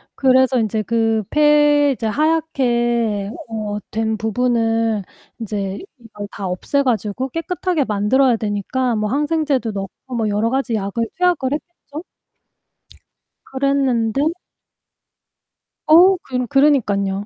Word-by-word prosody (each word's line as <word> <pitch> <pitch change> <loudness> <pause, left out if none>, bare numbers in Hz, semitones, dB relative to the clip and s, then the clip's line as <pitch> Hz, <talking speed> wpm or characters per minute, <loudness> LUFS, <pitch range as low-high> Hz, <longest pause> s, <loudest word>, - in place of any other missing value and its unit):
그래서 260 -1 +3
인제 220 0 -1
그 225 0 0
폐 295 -1 +4
이제 240 -4 -4
하얗게 240 -8 0 0.2
어 210 -2 -4
된 220 0 -1
부분을 225 -1 0 0.4
인제 200 -3 -4 0.2
이걸 210 -3 -9
다 200 - -6
없애 185 +10 -1
가지고 245 +1 -1
깨끗하게 335 +1 -2
만들어야 235 +5 +2
되니까 220 +4 -2
뭐 215 -1 -1
항생제도 290 -4 0
넣고 200 +6 -7
뭐 225 -2 0
여러 210 +2 0
가지 265 -3 -1
약을 215 +3 -2
투약을 350 -7 +1
했겠죠? 310 -1 -8 1.4
그랬는데 270 0 0 1.6
어 360 +5 +7
그러 250 -6 -4
그러니깐요. 205 -9 +2
240 Hz, 245 characters per minute, -19 LUFS, 215-280 Hz, 1.6 s, 어